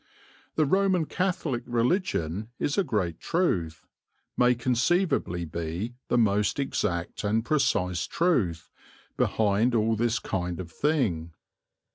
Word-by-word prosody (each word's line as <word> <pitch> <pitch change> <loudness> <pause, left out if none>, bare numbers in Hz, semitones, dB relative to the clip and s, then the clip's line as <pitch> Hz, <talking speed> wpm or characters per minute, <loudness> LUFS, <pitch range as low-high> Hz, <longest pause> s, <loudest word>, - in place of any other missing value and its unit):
The 155 - +3
Roman 190 +1 +2
Catholic 175 -9 -1
religion 115 - 0
is 145 - -1
a 200 - +2
great 95 - -1
truth, 90 - -1 0.5
may 125 0 +4
conceivably 120 - +1
be 85 +8 -4
the 120 - +1
most 105 -2 +2
exact 90 -11 -2
and 110 +2 +1
precise 90 - +1
truth, 105 - 0 0.4
behind 110 +3 +2
all 110 0 +2
this 115 +1 +1
kind 90 -4 -3
of 85 -3 -7
thing. 100 - 0
115 Hz, 115 wpm, -27 LUFS, 90-145 Hz, 0.5 s, may